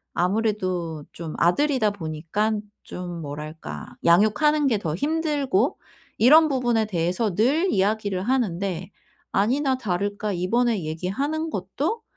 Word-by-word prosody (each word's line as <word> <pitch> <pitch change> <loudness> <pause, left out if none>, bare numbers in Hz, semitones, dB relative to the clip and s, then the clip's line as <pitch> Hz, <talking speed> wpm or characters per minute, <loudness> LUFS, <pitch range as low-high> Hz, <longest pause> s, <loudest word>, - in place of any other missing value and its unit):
아무래도 185 -5 -1
좀 165 -2 -6
아들이다 240 - +3
보니깐 200 +5 -2 0.2
좀 175 -2 -6
뭐랄까 150 +2 -7 0.2
양육하는 275 - +4
게 230 - +2
더 160 -6 -2
힘들고 290 - 0 0.4
이런 310 +7 +7
부분에 240 -4 +1
대해서 185 +2 -1
늘 290 - +2
이야기를 200 -1 0
하는데 195 -7 -1 0.4
아니나 260 +6 +1
다를까 205 0 -2
이번에 210 +3 +1
얘기하는 265 - -2
것도 285 - -2
210 Hz, 275 characters per minute, -24 LUFS, 180-260 Hz, 0.4 s, 이런